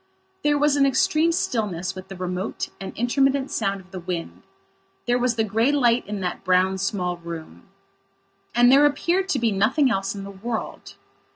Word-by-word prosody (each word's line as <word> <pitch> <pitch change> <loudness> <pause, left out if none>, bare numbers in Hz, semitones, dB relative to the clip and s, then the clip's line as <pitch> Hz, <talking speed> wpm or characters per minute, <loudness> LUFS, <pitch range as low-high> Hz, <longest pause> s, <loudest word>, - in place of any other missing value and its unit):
There 295 0 +3
was 295 0 +3
an 275 - +4
extreme 310 +5 +2
stillness 200 - -1
with 185 0 -9
the 195 - -8
remote 180 +2 -4
and 195 - -6
intermittent 270 +3 +1
sound 195 0 -1
of 185 0 -22
the 190 - -6
wind. 175 -1 -5 0.6
There 245 0 +2
was 245 -1 +1
the 225 - +1
grey 225 +5 +1
light 245 -6 +2
in 205 -1 -4
that 180 -1 -4
brown, 185 +1 +2
small 180 -2 -1
room. 170 -2 -9 0.9
And 245 +1 +6
there 285 +2 +7
appeared 350 +6 0
to 290 - +1
be 230 -3 +1
nothing 240 +7 +2
else 195 -1 -1
in 200 - -6
the 200 - -8
world. 220 +4 -6
220 Hz, 180 wpm, -23 LUFS, 190-270 Hz, 0.9 s, there